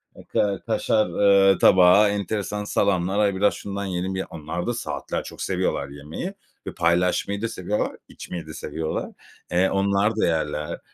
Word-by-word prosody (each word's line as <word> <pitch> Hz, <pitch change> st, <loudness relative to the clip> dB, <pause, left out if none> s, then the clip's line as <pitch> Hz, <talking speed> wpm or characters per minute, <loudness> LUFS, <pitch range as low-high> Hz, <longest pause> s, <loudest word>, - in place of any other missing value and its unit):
hatta 100 Hz, -2 st, -1 dB
kaşar, 110 Hz, -1 st, +1 dB
ııı, 95 Hz, +1 st, +4 dB
tabağı, 95 Hz, +3 st, +6 dB
enteresan 105 Hz, +1 st, -2 dB
salamlar. 100 Hz, -1 st, +1 dB
Ay, 100 Hz, -2 st, +2 dB
biraz 100 Hz, +2 st, +3 dB
şundan 100 Hz, 0 st, -5 dB
yiyelim 95 Hz, 0 st, -3 dB
ya. 95 Hz, -, -2 dB
Onlar 85 Hz, +5 st, -5 dB
da 120 Hz, -, 0 dB
saatlerce 120 Hz, -, -4 dB
çok -, -, -10 dB
seviyorlar -, -, -1 dB
yemeyi 75 Hz, -, -6 dB, 0.3 s
ve -, -, -4 dB
paylaşmayı 90 Hz, +4 st, +1 dB
da 115 Hz, -, 0 dB
seviyorlar, 105 Hz, -2 st, -2 dB, 0.2 s
içmeyi 85 Hz, -3 st, -8 dB
de 80 Hz, -, -8 dB
seviyorlar. 80 Hz, 0 st, -4 dB, 0.4 s
Eee, 90 Hz, +2 st, +3 dB
onlar 100 Hz, +2 st, +1 dB
da -, -, +2 dB
yerler. 75 Hz, -2 st, -2 dB
95 Hz, 155 wpm, -24 LUFS, 85-100 Hz, 0.4 s, tabağı